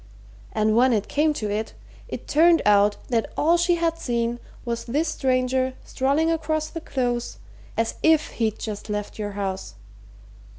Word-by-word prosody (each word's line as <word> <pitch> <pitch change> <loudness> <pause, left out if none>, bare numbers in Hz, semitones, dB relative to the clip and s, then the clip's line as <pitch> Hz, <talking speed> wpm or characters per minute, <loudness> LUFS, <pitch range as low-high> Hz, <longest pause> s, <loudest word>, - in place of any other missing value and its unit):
And 215 0 +1
when 250 +2 +5
it 210 -2 0
came 305 +2 +2
to 210 -5 -3
it, 215 +2 -3 0.3
it - - -7
turned 330 +2 +5
out 205 0 +4
that 230 -3 0
all 330 +3 +4
she 345 0 +3
had 330 -1 0
seen 235 -2 -1 0.3
was 235 -1 -3
this 295 +7 0
stranger 260 -1 0
strolling 285 +5 +1
across 310 -1 -1
the 330 - -6
Close 245 -5 -2 0.4
as 225 0 +1
if 315 -1 +4
he'd 220 -1 +1
just 215 -1 -6
left 210 +1 -4
your 205 -1 -3
house. 190 - -4
250 Hz, 160 wpm, -24 LUFS, 215-310 Hz, 0.4 s, when